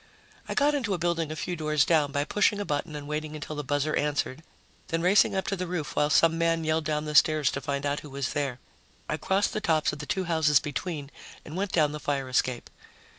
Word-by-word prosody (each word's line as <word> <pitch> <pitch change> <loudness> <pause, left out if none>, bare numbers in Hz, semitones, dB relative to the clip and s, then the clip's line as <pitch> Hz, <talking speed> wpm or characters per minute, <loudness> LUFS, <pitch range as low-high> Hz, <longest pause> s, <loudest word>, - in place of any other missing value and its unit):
I - - -2
got 290 +1 +3
into 230 -9 0
a - - -3
building 170 -2 -1
a - - -4
few 175 +3 -3
doors 155 -3 +1
down 150 -4 +2
by 145 0 0
pushing 205 +5 +2
a 205 - -2
button 150 0 -2
and 145 -1 -6
waiting 155 0 -4
until 155 0 -6
the 150 - -3
buzzer 145 +2 0
answered, 145 -1 -1 0.5
then 165 0 -1
racing 195 +2 +4
up 190 - -1
to 195 - -1
the 180 -1 -4
roof 170 -4 -4
while 150 - +2
some 165 +2 +4
man 165 0 +1
yelled 155 0 0
down 150 0 -1
the 150 - -4
stairs 150 -2 +4
to 140 - -4
find 140 +1 -3
out 145 +1 0
who 150 - -11
was 135 -2 -3
there. 140 -4 -2 0.5
I - - -1
crossed 195 +2 0
the 215 - -2
tops 155 -5 +1
of 150 - -7
the 150 - -7
two 190 -2 -1
houses 160 -5 +3
between 145 0 -5 0.3
and 155 - -8
went 195 +1 -2
down 155 -3 +3
the 150 - -5
fire 140 -3 -2
escape. 125 -1 -1
155 Hz, 240 wpm, -27 LUFS, 145-170 Hz, 0.5 s, racing